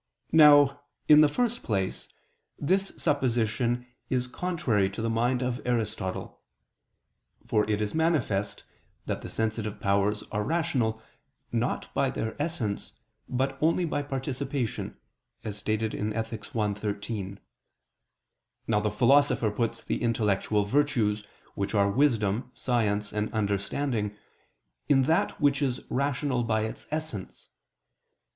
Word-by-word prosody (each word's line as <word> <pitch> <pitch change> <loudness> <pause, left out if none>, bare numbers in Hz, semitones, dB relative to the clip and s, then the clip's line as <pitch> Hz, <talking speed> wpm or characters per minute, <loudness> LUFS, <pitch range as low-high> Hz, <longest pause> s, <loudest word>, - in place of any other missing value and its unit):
Now, 145 -3 +7 0.3
in 150 0 +9
the 150 - +6
first 240 +7 0
place, 95 - -2 0.5
this 190 +6 +1
supposition 120 -4 +1 0.2
is 125 -1 +1
contrary 125 - 0
to 100 - -8
the 115 0 0
mind 120 +3 +1
of 125 -1 -2
Aristotle. 110 -6 -2 1.0
For 105 0 +1
it 105 -1 +1
is 105 - -3
manifest 155 -12 0 0.4
that - - -3
the - - -7
sensitive 110 -1 -2
powers 100 +1 +1
are 105 0 -1
rational, 135 -8 0 0.5
not - - -1
by - - +2
their 110 - -3
essence, 135 -11 -3 0.4
but 135 +2 -1
only 165 +3 +3
by 145 -2 -1
participation 135 - -3 0.5
(Ethic. 110 +1 -3
i, 105 -2 +1
13). 100 -1 -4 1.3
Now 105 -2 +2
the 105 0 0
Philosopher 120 +1 +4
puts 115 +1 -2
the - - -2
intellectual 105 -3 +1
virtues, 110 -5 +1 0.3
which 100 +2 -2
are 100 -1 +3
wisdom, 115 -3 +1
science 105 -4 0
and 105 0 -1
understanding, 105 +2 -1 0.7
in 135 -2 +5
that 160 +5 +1
which 145 -2 +3
is 130 -3 -1
rational 140 -1 0
by 110 -1 +1
its 110 +1 -5
essence. 155 -11 -5
115 Hz, 120 wpm, -28 LUFS, 105-140 Hz, 1.3 s, in